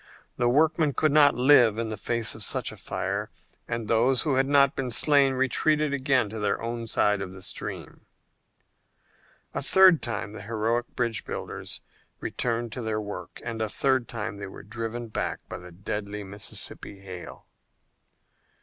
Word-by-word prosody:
The 120 - +2
workmen 155 +2 +3
could 155 +4 +2
not 145 -2 +6
live 125 -4 +5
in 115 -1 -2
the 110 - -3
face 115 0 0
of 110 - -6
such - - 0
a - - -12
fire, - - -3 0.4
and 115 -2 -3
those 120 +3 +3
who 150 -4 0
had 135 +1 +2
not 140 -1 +4
been 130 -2 -2
slain 140 +2 +4
retreated 150 +3 +1
again 130 -4 +2
to 110 - -5
their 105 - 0
own 115 0 -4
side 105 -2 +2
of 95 -1 -6
the 95 - -10
stream. - - -6 1.5
A - - -2
third 190 -4 +6
time 110 -3 -3
the 110 - -8
heroic 115 +3 -1
bridge 115 -3 0
builders - - -6 0.4
returned 120 -1 -2
to 125 - -4
their 110 -1 -1
work, 105 -1 -7
and 115 -1 -4
a 110 - 0
third 130 +1 +1
time 110 -2 -4
they 100 -1 -6
were - - -11
driven 115 +2 -5
back 110 - -3
by - - -6
the 90 0 -11
deadly 100 +3 -5
Mississippi 100 0 -3
hail. 95 -2 -9
115 Hz, 170 wpm, -26 LUFS, 105-135 Hz, 1.5 s, not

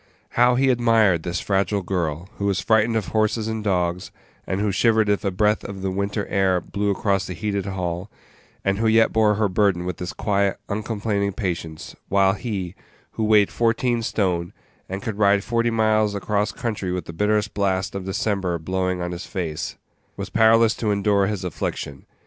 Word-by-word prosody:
How 125 +1 +4
he 130 +1 +3
admired 115 -8 +3
this 90 +2 -3
fragile 100 0 0
girl, 85 -2 -2
who 100 - -1
was 100 -2 +1
frightened 110 +3 +2
of 110 -3 -1
horses 110 0 0
and 110 -1 -3
dogs, 90 -3 0 0.4
and 95 - -1
who 105 0 +1
shivered 110 +1 +3
if 105 - +1
a 100 - +1
breath 105 +3 +1
of 95 -1 -7
the 95 - -1
winter 100 +2 -2
air 95 -2 +2
blew 100 +3 -2
across 100 -1 0
the 90 - -5
heated 100 +2 -2
hall, 90 0 -3 0.6
and 100 +1 +1
who 115 - +2
yet 110 0 +4
bore 110 -1 +3
her 105 0 +2
burden 95 -2 +1
with 90 -1 -3
this 90 0 -4
quiet, 100 -1 0
uncomplaining 100 -1 -2
patience; 85 -5 -4
while 95 -1 +4
he, 100 -5 -4 0.4
who 110 - -3
weighed 105 -2 +4
fourteen 120 +1 +1
stone, 90 -6 -1 0.4
and 95 +1 -5
could 110 -2 -4
ride 100 -1 +4
forty 115 +1 +1
miles 110 -2 +2
across 105 +1 0
country 105 -6 -3
with 90 -3 -3
the 85 - -8
bitterest 105 +4 0
blasts 95 -2 0
of 100 -1 -4
December 95 -3 -1
blowing 90 +2 -2
on 90 - -3
his 90 0 -6
face, 85 -6 -4 0.4
was - - -5
powerless 110 0 +5
to 110 - -2
endure 100 -1 +2
his 100 -3 -3
affliction. 70 -5 -4
100 Hz, 185 wpm, -23 LUFS, 95-110 Hz, 0.6 s, powerless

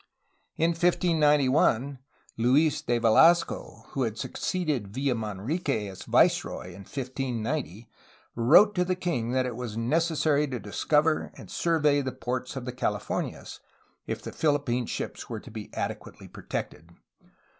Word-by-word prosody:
In 165 +1 +3
1591 150 -6 +2 0.4
Luis 135 +6 +3
de 120 0 0
Velasco, 160 +10 +3
who 135 - -3
had 115 -3 -1
succeeded 145 - -2
Villamanrique 115 - -2
as 95 - -11
viceroy 90 - +2
in 90 +2 -11
1590, 125 - -4 0.5
wrote 130 - +6
to 180 - +1
the 185 0 -1
king 170 -11 -2
that 130 0 +2
it 125 -2 -4
was 120 -3 -5
necessary 150 +3 +1
to 130 -2 -4
discover 150 +9 +1
and - - -12
survey 150 -4 +2
the 130 -1 -3
ports 125 +2 -4
of 130 -2 -5
the 125 - -3
Californias, 110 -5 -3 0.5
if - - -4
the - - -6
Philippine 140 -6 0
ships - - -5
were - - -4
to - - -13
be - - -8
adequately - - -5
protected. 80 +3 -6
135 Hz, 135 wpm, -27 LUFS, 115-155 Hz, 0.5 s, wrote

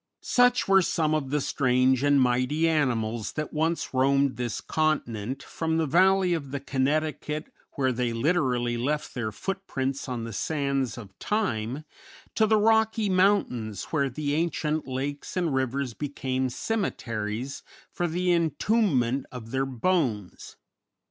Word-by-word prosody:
Such 245 0 +3
were 195 0 +6
some 160 -3 +1
of 150 -4 -1
the 150 +2 +1
strange 130 -2 +2
and 145 0 +4
mighty 130 +6 +2
animals 120 -8 0
that 155 0 -4
once 160 +1 -1
roamed 135 +1 +3
this 120 -4 -3
continent 135 -5 -1
from 160 0 -2
the 165 - +2
valley 185 +4 +4
of 150 -5 -3
the 140 +1 -3
Connecticut, 150 +3 -1 0.2
where 130 -2 +1
they 120 -1 -1
literally 125 -2 +1
left 150 +5 -2
their 115 -4 -3
footprints 135 - -3
on 120 -2 -3
the 115 0 -6
sands 140 0 -1
of 95 -5 -11
time, 140 - -1 0.5
to 220 - +3
the 220 0 +4
Rocky 220 0 +3
Mountains, 185 - +1
where 140 -4 +1
the 145 +3 -2
ancient 155 -1 -1
lakes 140 +6 -4
and 170 -5 0
rivers 130 -1 -1
became 130 -1 -2
cemeteries 120 - -3 0.3
for 175 - -1
the 180 +2 0
entombment 165 - +1
of 115 -3 -8
their 135 0 0
bones. 125 - -1
140 Hz, 140 wpm, -27 LUFS, 125-165 Hz, 0.5 s, were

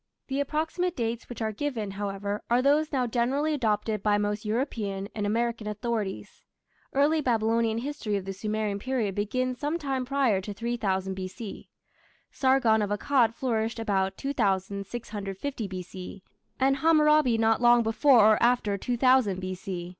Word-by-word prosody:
The 270 +1 -1
approximate 320 +5 -1
dates 230 -1 -3
which 240 -2 -5
are 220 - -1
given, 220 -4 -3
however, 200 +1 -3
are 240 +1 +4
those 295 +2 +3
now 260 -4 +1
generally 260 +6 0
adopted 215 -5 0
by 205 0 +2
most 205 +1 -2
European 210 -4 -2
and 205 -2 -2
American 230 0 -1
authorities. 210 -2 -4 0.5
Early 295 +3 +3
Babylonian 225 -2 +1
history 245 -4 -3
of 195 -2 -3
the 195 - -4
Sumerian 210 0 -2
period 235 -4 -1
begins 250 +5 -2
some 295 +4 -1
time 270 -5 -2
prior 255 -7 +1
to 205 +1 -7
3000 195 -5 -1
B.C; 190 +3 -7 0.6
Sargon 260 -5 +3
of 205 - -1
Akkad 230 +2 +2
flourished 225 -3 -1
about 195 -4 -1
2650 205 0 -3
B.C., 185 0 -8 0.4
and 270 +1 +3
Hammurabi 300 -5 +4
not 225 0 +2
long 240 0 +6
before 235 +3 +5
or 215 0 +5
after 235 -4 +2
2000 245 -5 +2
B.C. 185 -1 -5
225 Hz, 145 wpm, -27 LUFS, 205-260 Hz, 0.6 s, long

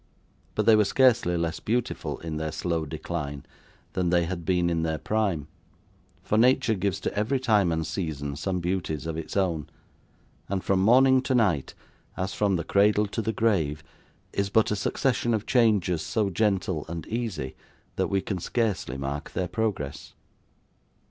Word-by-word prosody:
But - - +1
they 110 - +7
were 105 - +5
scarcely 115 -5 +3
less 85 -1 -2
beautiful 120 +2 -2
in 80 -2 -4
their 80 0 -2
slow 80 0 -2
decline, 70 -2 -5 0.5
than 90 -2 0
they 85 -1 +3
had 85 -1 -5
been 90 0 +2
in 85 -1 0
their 80 -1 -1
prime; 95 -7 -1 0.8
for 105 - +1
nature 125 -1 +4
gives 100 -1 -1
to - - -3
every 110 +6 +1
time 105 -8 +3
and 80 -1 -1
season 75 -4 -3
some 90 +4 -2
beauties 85 -5 -2
of 80 -1 -3
its 80 +4 -5
own; 85 -5 0 0.8
and 95 -1 -1
from 95 -1 +2
morning 130 +5 +6
to 130 0 0
night, 95 - +1 0.4
as 95 0 -2
from 100 -2 +1
the 85 - -1
cradle 105 +4 +3
to 115 - -2
the 110 - -1
grave, 85 -10 0 0.5
is 100 0 0
but 110 +2 +3
a - - +2
succession 120 +2 0
of 105 - -3
changes 105 -9 +2
so 100 +3 0
gentle 95 -5 0
and 85 -1 -5
easy, 105 - -3 0.4
that - - 0
we 100 -1 0
can 95 -2 -3
scarcely 100 - -1
mark 70 +3 -4
their 90 - -1
progress. 95 -8 -3
95 Hz, 170 wpm, -26 LUFS, 80-110 Hz, 0.8 s, they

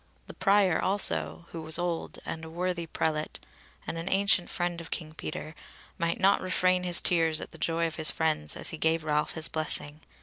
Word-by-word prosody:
The - - -10
Prior 195 -4 +3
also, 80 - +1
who 165 - -6
was 160 0 +4
old, 175 -1 -3
and 160 - -5
a 160 - -8
worthy 175 0 -3
prelate, 155 -1 -2 0.5
and 165 - -4
an 165 - -4
ancient 195 -2 +3
friend 175 -1 -2
of 165 - -11
King 155 -2 -5
Peter, 155 -1 -6 0.5
might 170 0 -1
not 195 +1 +4
refrain 185 0 +2
his 180 -1 +3
tears 165 -2 +2
at - - -8
the - - -13
joy 165 0 0
of 165 - -4
his 160 -1 +3
friends 155 -2 0
as - - -1
he 160 - -7
gave 160 0 +1
Ralph 150 -1 0
his 160 0 0
blessing. 155 -1 0
165 Hz, 200 wpm, -28 LUFS, 155-180 Hz, 0.5 s, was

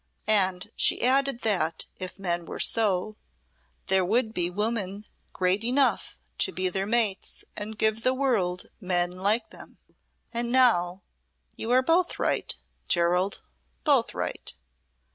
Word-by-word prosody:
And 190 -1 +2
she - - +3
added 270 0 +2
that 180 -7 0
if 185 0 -5
men 175 -3 -2
were - - -7
so, 210 -1 +1 0.7
there 190 0 +2
would 220 +4 0
be 175 -4 +1
women 205 0 -2 0.3
great 185 +3 +1
enough 260 +4 +1 0.2
to - - +3
be 185 0 +1
their 195 +2 -2
mates 220 -4 0
and 215 +1 -5
give 220 +1 +1
the 255 +2 +2
world 210 -10 0 0.2
men 180 -3 0
like 205 +5 0
them. - - -13 0.6
And 235 0 -2
now 195 -8 +3 0.5
you 225 - -6
are 255 +1 +4
both 345 +5 +1
right, - - -1 0.3
Gerald; 180 +3 +1 0.4
both 275 -6 +2
right. 90 0 -5
205 Hz, 135 wpm, -26 LUFS, 180-235 Hz, 0.7 s, are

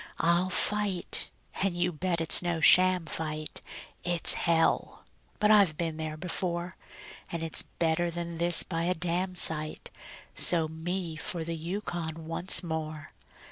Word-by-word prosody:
I'll 170 +3 +2
fight 200 0 +1 0.3
and 190 -2 0
you 175 +1 0
bet 170 +1 -2
it's 165 - +5
no 175 -2 -2
sham 185 +1 +5
fight; 155 -1 -5 0.4
It's 175 -2 +4
hell! 165 -1 0 0.3
but 210 0 +3
I've 195 -8 +4
been 165 -2 -3
there 155 -1 -5
before; 175 +1 -3 0.6
And 170 -1 -4
it's 165 - +2 0.2
better 170 +1 0
than 170 0 -6
this 170 0 +4
by 165 -1 -3
a 180 +1 0
damsite 170 -2 -1 0.4
So 165 -3 +3
me 165 +1 -5
for 165 +1 -4
the 165 +1 -4
Yukon 165 -2 -5
once 170 +2 +1
more. 155 -2 -6
170 Hz, 140 wpm, -28 LUFS, 160-180 Hz, 0.6 s, it's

